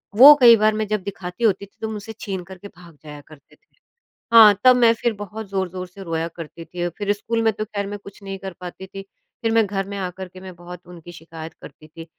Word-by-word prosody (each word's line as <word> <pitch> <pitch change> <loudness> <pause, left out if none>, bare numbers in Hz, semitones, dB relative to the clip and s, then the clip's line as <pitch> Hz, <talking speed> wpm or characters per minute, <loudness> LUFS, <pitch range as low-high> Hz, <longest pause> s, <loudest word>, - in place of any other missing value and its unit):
वो 275 +7 +11
कई 235 -2 +9
बार 215 0 +3
मैं 215 0 -2
जब 210 -2 -2
दिखाती 190 +2 -7
होती 200 -3 +2
थी 200 - -30
तो 220 - -3
मुझसे 215 +1 -7
छीन 190 -3 -5
कर 190 +1 -12
के 200 - -11
भाग 170 -3 -17
जाया 150 -1 -10
करते 155 -2 -18
थे। - - -41 0.6
हाँ, 220 -3 +9
तब 255 -1 +7
मैं 235 -2 +5
फिर 235 +1 -1
बहुत 205 +1 -8
ज़ोर-ज़ोर 185 -1 -3
से 195 +2 -12
रोया 165 -1 -2
करती 165 0 -9
थी 175 +1 -4
फिर 205 -1 0
स्कूल 225 +3 -2
में 225 -1 +3
तो 215 +1 -4
खैर 200 -2 -4
मैं 205 +1 -6
कुछ 200 +1 -14
नहीं 195 0 -6
कर 190 0 -7
पाती 180 +1 -8
थी। 195 +1 -9 0.4
फिर 225 -1 0
मैं 225 -1 +3
घर 195 -1 -3
में 200 - -6
आ 185 -2 -2
कर 185 +1 -9
के 185 +1 -14
मैं 185 -1 -10
बहुत 175 +1 -11
उनकी 175 -1 -12
शिकायत 165 -1 -10
करती 155 - -13
थी। 165 +1 -11
195 Hz, 250 wpm, -21 LUFS, 175-215 Hz, 0.6 s, वो